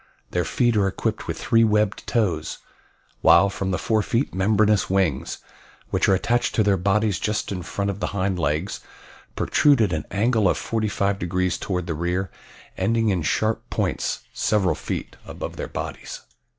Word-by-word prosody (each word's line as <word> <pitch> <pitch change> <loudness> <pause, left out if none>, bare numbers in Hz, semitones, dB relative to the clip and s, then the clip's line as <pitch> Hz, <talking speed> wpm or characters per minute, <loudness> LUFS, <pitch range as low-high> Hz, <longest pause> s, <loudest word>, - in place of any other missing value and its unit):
Their 90 -1 0
feet 120 -2 +1
are 100 -1 +3
equipped 95 - -3
with - - -3
three 115 0 +3
webbed 105 -2 +1
toes, 90 -10 0 0.6
while 85 +4 +6
from 100 -1 -3
the 90 - 0
fore 110 -1 +1
feet 115 +6 -1
membranous 105 +2 +2
wings, 95 -8 0 0.5
which - - +2
are 95 - +5
attached 120 +5 0
to 110 - +3
their 100 -1 +3
bodies 100 +1 +1
just 105 -1 -2
in 90 -2 -3
front 100 +3 -2
of 100 - -8
the - - -1
hind 95 -2 -1
legs, 80 +4 -1 0.6
protrude 145 -4 +3
at 105 -6 +2
an 75 -1 -2
angle 110 -1 +2
of - - +1
45 100 -3 -1
degrees 90 +1 0
toward 90 -3 -2
the 85 - -2
rear, 90 +4 -2 0.5
ending 115 +3 +2
in 95 -4 +1
sharp 110 +8 -1
points - - -1
several 100 -6 +1
feet - - -5
above - - -6
their - - -5
bodies. - - -6
100 Hz, 170 wpm, -23 LUFS, 90-110 Hz, 0.6 s, while